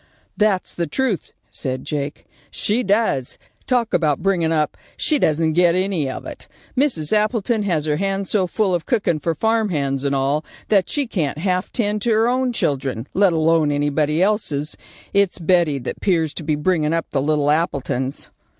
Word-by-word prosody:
"That's 210 -3 +1
the 170 -1 -2
truth," 235 - -1 0.2
said 130 -1 -4
Jake; 145 -1 -4 0.2
"she 220 +4 0
does. 200 - 0 0.3
Talk 245 -3 +1
about 155 -2 +1
bringin' 175 -5 +1
up. 155 -2 0 0.2
She 300 -3 +2
doesn't 160 - +2
get 175 0 +4
any 185 -7 0
of - - -6
it. - - -9 0.3
Mrs. 250 - +1
Appleton 215 +1 +1
has 170 -7 0
her 150 -1 0
hands 195 +1 -2
so 190 -4 +2
full 195 0 0
of 175 -2 -2
cookin' 200 - +1
for 165 +2 -1
farm 220 +4 +1
hands 140 -5 -1
and 140 -1 0
all, 140 +3 0 0.3
that 195 -4 +3
she 290 -2 0
can't 160 - -2
half 180 +2 -1
tend 210 -3 -1
to 235 - +1
her 220 +2 +3
own 255 +1 +1
children, 135 - -1
let 195 -1 +4
alone 160 -2 +2
anybody 145 +3 +1
else's. 155 -8 -1 0.4
It's 200 -2 +2
Betty 170 -4 +2
that 125 - -6
'pears 165 -6 +1
to 165 - -6
be 150 0 0
bringin' 155 0 +1
up 165 0 0
the 135 - 0
little 145 0 +2
Appletons." 140 -4 -2
170 Hz, 175 wpm, -21 LUFS, 150-205 Hz, 0.4 s, get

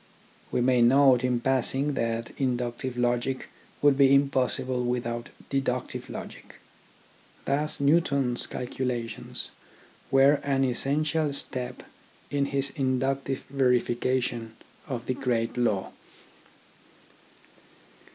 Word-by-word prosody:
We - - +1
may 125 0 +3
note 130 +1 +5
in 125 -1 +1
passing 135 +3 0
that 115 -2 -2
inductive 125 -1 -2
logic 120 +2 0 0.3
would 145 -1 +5
be 140 0 +7
impossible 130 -2 +1
without 120 -1 -2 0.2
deductive 130 -2 -2
logic. - - -9 0.9
Thus 150 +2 -1
Newton's 140 -4 +2
calculations 120 -3 -3 0.6
were 135 +2 +5
an 135 -1 +1
essential 150 +4 0
step 125 -3 -2 0.5
in 140 -1 +1
his 140 0 -1
inductive 135 0 -1
verification 125 -3 0 0.3
of 125 -4 -4
the 130 - 0
great 120 -3 -1
law. 110 -6 0
130 Hz, 95 wpm, -27 LUFS, 120-140 Hz, 0.9 s, be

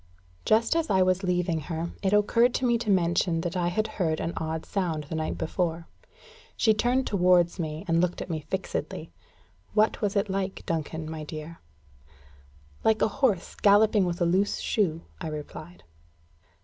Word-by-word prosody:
Just 230 +7 +3
as 330 -1 0
I 190 -1 +4
was 185 0 +2
leaving 180 -3 0
her, 165 +2 -4
it 190 - +1
occurred 230 +4 +3
to 260 - 0
me 235 -1 +2
to 225 - -3
mention 175 -2 +2
that 175 +2 -3
I 175 -1 +1
had 215 +5 0
heard 160 -7 -1
an 170 - -2
odd 160 0 -3
sound 170 -6 -2
the 150 - -8
night 155 0 -2
before. 165 0 -2 0.7
She 220 - +4
turned 245 +4 +1
towards 180 -2 +3
me, 155 +2 -4
and 165 0 +3
looked 180 0 0
at - - -5
me 165 -3 -2
fixedly. 150 - -4 0.6
"What 215 +2 +3
was 205 -1 0
it 200 +1 +2
like, 190 0 -3
Duncan, 160 -1 -3
my 160 -1 -5
dear?" 155 +2 -8 1.2
"Like 220 0 +3
a - - +4
horse 215 -11 +1
galloping 205 0 +4
with 175 -1 -2
a 175 - +2
loose 190 +4 +2
shoe," 165 -7 0 0.2
I 165 - -4
replied. 155 +3 -8
180 Hz, 175 wpm, -27 LUFS, 165-205 Hz, 1.2 s, I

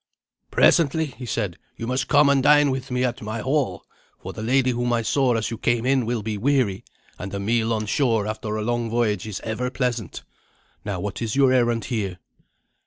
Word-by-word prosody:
"Presently," 160 -1 +3
he 130 -3 -9
said, 100 -6 -2 0.2
"you 115 - -5
must 125 +2 -1
come 145 0 +5
and 140 -1 +4
dine 145 0 +5
with 130 0 -4
me 125 0 0
at 125 -2 -2
my 110 +1 -4
hall; 140 +3 -1 0.3
for - - -8
the - - -7
lady 130 +3 +2
whom 120 0 -1
I 115 -1 +1
saw 130 +1 +2
as 115 0 -1
you 115 - -5
came 120 0 +1
in 130 -3 +2
will 120 -3 -1
be 105 -1 -3
weary, 125 -6 +1 0.4
and 95 +1 -6
a - - -3
meal 115 +3 0
on 110 -1 -1
shore 115 -2 +1
after 110 0 -4
a 110 - -2
long 120 0 -1
voyage 110 -4 0
is 105 -3 -5
ever 120 +3 -3
pleasant. 125 -4 -3 0.6
Now 100 -3 -3
what 100 +3 -5
is 115 0 -2
your 135 -2 +4
errand 120 -3 +2
here?" 100 -7 -3
120 Hz, 205 wpm, -23 LUFS, 110-130 Hz, 0.6 s, come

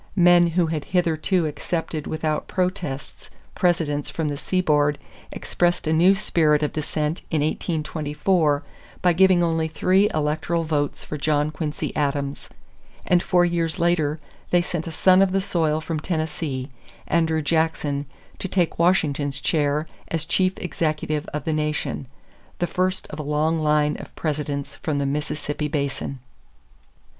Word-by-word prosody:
Men 175 -1 +6
who 175 - +4
had 155 -2 -3
hitherto 170 +1 +1
accepted 155 +1 -3
without 155 -1 -2
protests 180 -7 -3 0.2
Presidents 160 -5 +1
from 160 -2 -2
the 145 - -2
seaboard 150 -3 +1 0.3
expressed 175 -1 0
a 155 - +1
new 180 +5 +5
spirit 155 -6 +2
of 150 - -1
dissent 155 +1 -2
in 155 -3 +1
1824 155 0 0 0.4
by 180 -1 +5
giving 185 0 +5
only 165 -1 +1
three 185 +6 +3
electoral 155 +2 0
votes 150 -3 -1
for 150 - -6
John 150 0 +1
Quincy 150 0 -4
Adams; 140 -1 -2 0.6
and 180 -1 +3
four 175 0 +3
years 170 0 -1
later 165 -3 +1 0.3
they 175 - +4
sent 170 -1 -4
a - - -4
son 185 +3 +5
of 190 -1 +3
the 195 - +3
soil 160 -5 0
from 160 0 -3
Tennessee, 155 -5 -3 0.3
Andrew 160 -1 +1
Jackson, 150 -2 0 0.3
to - - -2
take 175 -3 0
Washington's 145 -6 +2
chair 150 +1 +1 0.2
as 160 -1 -2
chief 185 +2 +2
executive 155 -6 -2
of 150 - -4
the 160 - -1
nation 150 -3 -2 0.5
the 175 - 0
first 185 +1 -1
of 150 - -7
a - - -1
long 150 +2 +1
line 150 -1 +2
of - - -11
Presidents 145 -2 -3
from 150 -3 -2
the 140 - 0
Mississippi 150 +1 -2
basin. 140 -2 -2
155 Hz, 145 wpm, -23 LUFS, 150-175 Hz, 0.6 s, Men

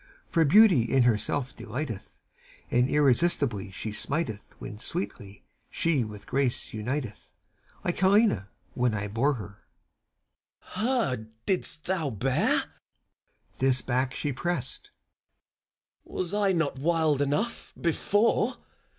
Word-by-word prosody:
For 165 - +4
Beauty 195 - +7
in 135 -2 +4
herself 125 +3 0
delighteth; 120 -1 -6 0.5
And 125 +2 +3
irresistibly 140 - +2
she 100 +3 -5
smiteth 115 -2 -3
When 105 - -8
sweetly 100 -1 -6 0.2
she 160 -7 +1
with 105 -2 -9
Grace 135 -2 -1
uniteth, 120 0 -4 0.5
Like 175 - -1
Helena, 190 - +3 0.2
when 125 -2 +1
her 105 - -1
I 105 - -3
bore. 110 -3 -1 1.0
FAUST. - - -15
Her 215 - +1 0.2
didst 180 -4 0
thou 175 -6 0
bear? 125 +3 +1
CHIRON. - - -12 0.9
This 130 -1 +2
back 130 0 0
she 145 - -2
pressed. 175 0 -3
FAUST. - - -30 1.1
Was 185 +1 -1
I 205 -2 +3
not 165 -7 0
wild 155 -2 +2
enough, 150 +12 -1
before? 210 +7 +2
135 Hz, 120 wpm, -27 LUFS, 115-170 Hz, 1.1 s, Beauty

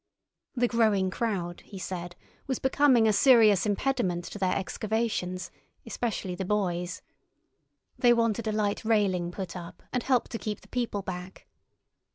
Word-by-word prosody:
The 245 -1 +2
growing 215 -5 +2
crowd, 185 -6 -2
he 200 - -10
said, 175 -1 -5 0.3
was 265 -3 -1
becoming 265 -4 +4
a 215 - +4
serious 215 -4 +5
impediment 190 -6 0
to 205 - -7
their 185 -1 +1
excavations, 195 -3 -2 0.3
especially 225 -5 -3
the 185 +2 -4
boys. 180 -3 -1 1.0
They 245 - +5
wanted 230 -1 +1
a - - +1
light 210 -1 -1
railing 195 -6 +1
put 185 -1 -6
up, 170 -1 -9
and 250 - +1
help 255 0 +1
to 230 - -5
keep 210 -1 -4
the - - -18
people 235 -5 -2
back. 185 0 -7
205 Hz, 150 wpm, -28 LUFS, 185-230 Hz, 1.0 s, serious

